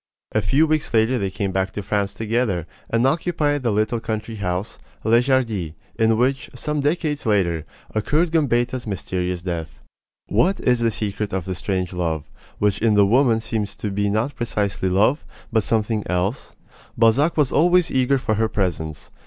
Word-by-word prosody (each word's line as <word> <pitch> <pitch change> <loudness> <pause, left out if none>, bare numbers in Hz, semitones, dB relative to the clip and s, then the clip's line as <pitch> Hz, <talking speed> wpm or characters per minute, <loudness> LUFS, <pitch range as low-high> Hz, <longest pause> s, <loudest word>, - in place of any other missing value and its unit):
A - - +1
few 140 - +3
weeks 155 -1 0
later 115 +3 +3
they 100 -2 -1
came 100 0 -3
back 95 0 0
to 105 - -4
France 100 0 -1
together, 110 -6 -1 0.2
and 115 +2 +2
occupied 150 -1 +1
the 120 - 0
little 110 +3 0
country 110 0 -4
house, 90 0 -3 0.2
Les 115 +2 +4
Jardies, 115 - +1 0.2
in 110 -1 +2
which, 130 +3 0
some 150 +4 -2
decades 150 0 0
later, 85 -7 +1 0.3
occurred 155 +10 +1
Gambetta's 125 -6 +1
mysterious 90 -3 -3
death. 85 -3 -5 0.5
What 175 - +2
is 125 -1 +2
the 115 -1 +2
secret 105 -1 -3
of 95 -3 -2
this 95 -2 -4
strange 90 -1 -2
love, 80 -4 -1 0.3
which 105 -1 +1
in 110 -2 +3
the 100 -1 +6
woman 115 +1 +3
seems 105 -3 -3
to 105 - -4
be 100 +1 0
not 110 +7 0
precisely 105 -6 -1
love, 105 - +2 0.3
but 110 - +4
something 110 0 0
else? 90 +8 -2 0.4
Balzac 120 +9 +3
was 145 -4 +3
always 175 +2 +4
eager 130 +1 +2
for 115 -4 -1
her 110 +1 +1
presence. 85 -8 -3
110 Hz, 170 wpm, -22 LUFS, 95-130 Hz, 0.5 s, the